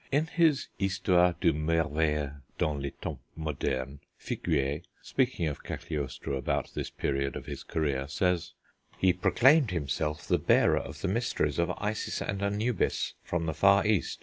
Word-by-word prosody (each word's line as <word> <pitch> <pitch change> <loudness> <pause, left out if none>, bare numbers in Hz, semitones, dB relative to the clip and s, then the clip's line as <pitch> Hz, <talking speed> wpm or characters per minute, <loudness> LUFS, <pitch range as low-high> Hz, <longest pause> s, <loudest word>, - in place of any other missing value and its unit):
In 145 +3 +3
his 160 -4 +2
Histoire 90 -2 +3
du 85 -3 +3
Merveilleux 75 -2 0 0.2
dans 75 - +1
les 70 - -2
Temps - - -4 0.2
modernes, 70 -3 -3 0.2
Figuier, 75 -2 -1 0.2
speaking 125 -9 0
of 75 -3 -4
Cagliostro 70 -2 -4
about 65 - -1
this - - -3
period 70 -1 -1
of - - -6
his - - -6
career, 70 -4 -1
says: 90 +3 0 0.4
"He 95 -1 +4
proclaimed 130 - +4
himself 75 -2 -2
the - - +3
bearer - - +4
of - - -8
the - - 0
mysteries 95 - 0
of 85 - +2
Isis 105 +1 -2
and 100 -1 -3
Anubis 105 +2 0
from 85 -1 -2
the 80 - -1
far 100 +6 +5
East.... 105 -4 +1
85 Hz, 150 wpm, -29 LUFS, 75-100 Hz, 0.4 s, far